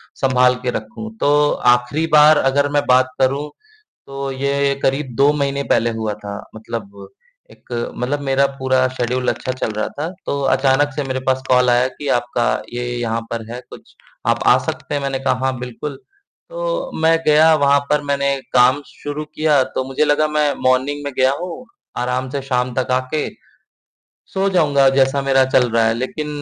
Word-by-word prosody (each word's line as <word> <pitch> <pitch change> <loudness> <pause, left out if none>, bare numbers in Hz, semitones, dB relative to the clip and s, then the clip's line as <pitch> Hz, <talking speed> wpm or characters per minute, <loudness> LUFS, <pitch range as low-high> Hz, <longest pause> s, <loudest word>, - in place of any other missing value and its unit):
संभाल 125 -1 +3
के 125 - -1
रखूँ, 110 - -6
तो 145 -2 +3 0.2
आखिरी 125 +6 -1
बार 150 0 +7
अगर 140 +2 +2
मैं 145 0 +2
बात 130 +1 +4
करूँ, 135 +3 +1 0.6
तो 135 0 -5
ये 140 +1 0
करीब 135 -1 0
2 140 +3 +4
महीने 140 -1 -1
पहले 115 +1 +3
हुआ 110 -1 -2
था 100 0 -5 1.2
एक - - -20 0.3
मतलब 135 +4 -2
मेरा 135 +1 +3
पूरा 130 0 +2
शेड्यूल 125 0 -2
अच्छा 130 - -3
चल 130 -3 -3
रहा 110 0 -2
था, 150 +3 -5 0.2
तो 140 - -2
अचानक 135 +1 +2
से 145 - -2
मेरे 130 0 -2
पास 130 0 +1
कॉल 125 -1 +4
आया 120 +1 +3
कि 145 +2 -8
आपका 120 0 -2 0.3
ये 120 - -3
यहाँ 115 -1 -2
पर 115 -1 -3
है, 125 - -6
कुछ - - -14 0.3
आप - - +2
आ - - +7
सकते 145 - -4
हैं? 140 - -1
मैंने 135 -1 -2
कहा 135 - +1
हाँ 130 -1 -1
बिल्कुल। 125 +3 -6 0.5
तो - - -3
मैं 165 +1 +4
गया 155 +1 +5
वहाँ 140 -1 +3
पर, 150 0 +2
मैंने 140 -1 0 0.2
काम 125 +3 +4
शुरू 145 +1 -6
किया, 150 -2 +1
तो 130 - -4
मुझे 135 +3 0
लगा 150 +1 +2
मैं 150 -1 +1
मॉर्निंग 130 +3 +1
में 140 - -4
गया 130 0 +4
हूँ, 180 +8 -7 0.3
आराम 125 +1 -2
से 140 0 -3
शाम 125 -2 -1
तक 130 - -2
आके 130 +4 -1 1.1
सो 195 0 +1
जाऊँगा, 145 -7 +3
जैसा 135 +1 +2
मेरा 135 -1 +3
चल 125 -2 +3
रहा 115 0 +2
है, 110 - +2
लेकिन 130 +5 -4
135 Hz, 180 wpm, -19 LUFS, 125-145 Hz, 1.2 s, बार